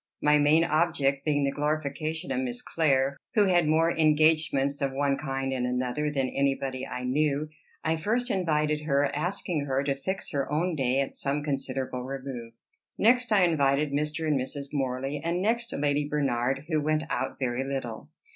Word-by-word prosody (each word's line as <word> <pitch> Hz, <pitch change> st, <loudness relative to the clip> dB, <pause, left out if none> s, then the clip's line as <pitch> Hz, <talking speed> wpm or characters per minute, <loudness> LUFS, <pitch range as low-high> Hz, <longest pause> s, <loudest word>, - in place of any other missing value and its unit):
My 150 Hz, 0 st, +4 dB
main 150 Hz, +3 st, +5 dB
object 155 Hz, -5 st, +1 dB
being 145 Hz, -2 st, +2 dB
the 140 Hz, -, +1 dB
glorification 155 Hz, +3 st, -2 dB
of 260 Hz, -, 0 dB
Miss 250 Hz, -1 st, -3 dB
Clare, 140 Hz, -4 st, +1 dB, 0.2 s
who 210 Hz, -2 st, +5 dB
had 175 Hz, -4 st, +3 dB
more 165 Hz, +2 st, +3 dB
engagements 155 Hz, -3 st, +3 dB
of 135 Hz, -1 st, 0 dB
one 140 Hz, 0 st, +1 dB
kind 135 Hz, -2 st, -3 dB
and 125 Hz, -1 st, -1 dB
another 125 Hz, +4 st, -1 dB
than 135 Hz, -3 st, 0 dB
anybody 135 Hz, -1 st, -1 dB
I 125 Hz, 0 st, -5 dB
knew, 145 Hz, +3 st, 0 dB, 0.3 s
I 160 Hz, 0 st, +1 dB
first 235 Hz, +9 st, 0 dB
invited 150 Hz, -5 st, +1 dB
her, 140 Hz, -1 st, +1 dB
asking 170 Hz, -1 st, -2 dB
her 135 Hz, 0 st, 0 dB
to 140 Hz, -1 st, +1 dB
fix 190 Hz, +8 st, -4 dB
her 140 Hz, -1 st, -2 dB
own 165 Hz, +3 st, 0 dB
day, 135 Hz, -1 st, +1 dB
at 135 Hz, -, -3 dB
some 140 Hz, +1 st, -1 dB
considerable 135 Hz, -3 st, -2 dB
remove. 130 Hz, -3 st, -6 dB, 0.4 s
Next 245 Hz, +2 st, +3 dB
I 200 Hz, -3 st, +5 dB
invited 145 Hz, -3 st, +2 dB
Mr. 150 Hz, +3 st, -1 dB
and 145 Hz, -4 st, +2 dB
Mrs. 140 Hz, +1 st, -5 dB
Morley, 135 Hz, +1 st, -2 dB
and 170 Hz, +2 st, 0 dB
next 230 Hz, +4 st, 0 dB
Lady 145 Hz, 0 st, 0 dB
Bernard, 135 Hz, -2 st, 0 dB
who 155 Hz, -3 st, +1 dB
went 155 Hz, +1 st, +1 dB
out -, -, -2 dB
very 125 Hz, -1 st, -1 dB
little. 135 Hz, -5 st, -5 dB
145 Hz, 175 wpm, -27 LUFS, 135-160 Hz, 0.4 s, main